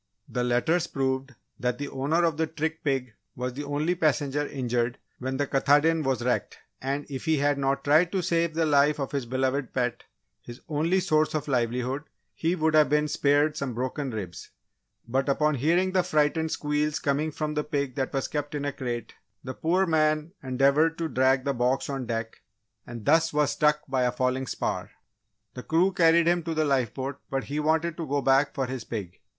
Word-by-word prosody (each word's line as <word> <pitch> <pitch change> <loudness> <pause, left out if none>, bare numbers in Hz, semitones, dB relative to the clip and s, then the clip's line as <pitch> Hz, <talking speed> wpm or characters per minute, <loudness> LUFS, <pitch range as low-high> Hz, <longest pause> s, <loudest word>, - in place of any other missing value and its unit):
The 125 - -2
letters 140 +8 +1
proved 135 0 -2 0.2
that 125 -1 -1
the 145 - -4
owner 145 +6 0
of 165 -3 +2
the 160 0 +1
trick 160 +1 -3
pig 135 -5 -1 0.2
was 125 0 -3
the 145 +3 -5
only 145 +4 0
passenger 145 -3 0
injured 125 -2 -1 0.2
when 130 +1 -3
the 145 - +1
Katahdin 145 +4 +3
was 135 -4 -1
wrecked, 125 0 -1 0.2
and 140 +2 -2
if 135 +1 -6
he 160 -1 +2
had 145 0 +1
not 135 0 0
tried 160 +4 +4
to 190 -2 0
save 165 -1 0
the 165 0 +2
life 145 0 +3
of 135 - -3
his 140 -4 -3
beloved 130 +1 -1
pet 125 -2 -1 0.4
his 120 +1 -10
only 165 +5 +1
source 155 -3 +1
of 155 - -2
livelihood, 125 +1 0 0.3
he 165 +2 0
would 160 -2 +1
have 155 -3 +5
been 150 +1 +2
spared 145 +1 +2
some 130 -4 -3
broken 130 +3 -3
ribs. 100 -7 -6 0.6
But, 135 +4 0
upon 150 +2 +2
hearing 170 +8 +2
the 185 0 +3
frightened 160 -2 +1
squeals 150 0 -1
coming 145 +2 0
from 150 0 -3
the 150 0 -1
pig 140 -4 -2
that 130 +1 -2
was 135 -2 -1
kept 145 0 -4
in 145 -1 -3
a 145 - -2
crate, 120 -3 -4 0.3
the 130 - -5
poor 180 +7 +1
man 155 -1 +1
endeavoured 140 +4 +2
to 165 -1 -2
drag 130 0 +2
the 140 - 0
box 125 +3 0
on 135 -3 -4
deck 115 -1 -4 0.5
and 120 -3 -8
thus 165 +2 +4
was 150 -1 +2
struck 150 0 +2
by 130 -1 0
a 125 -1 +2
falling 130 +1 -1
spar. - - -3 0.6
The 125 - -7
crew 175 +7 +2
carried 170 -2 +4
him 175 +1 +3
to 165 0 -4
the 155 0 +2
lifeboat 135 0 -1
but 135 -1 -1
he 145 +2 -3
wanted 160 +2 +1
to 165 -3 -4
go 140 0 0
back 135 +2 +3
for 135 - 0
his 130 -2 -5
pig! 100 -7 -6
145 Hz, 200 wpm, -27 LUFS, 130-155 Hz, 0.6 s, have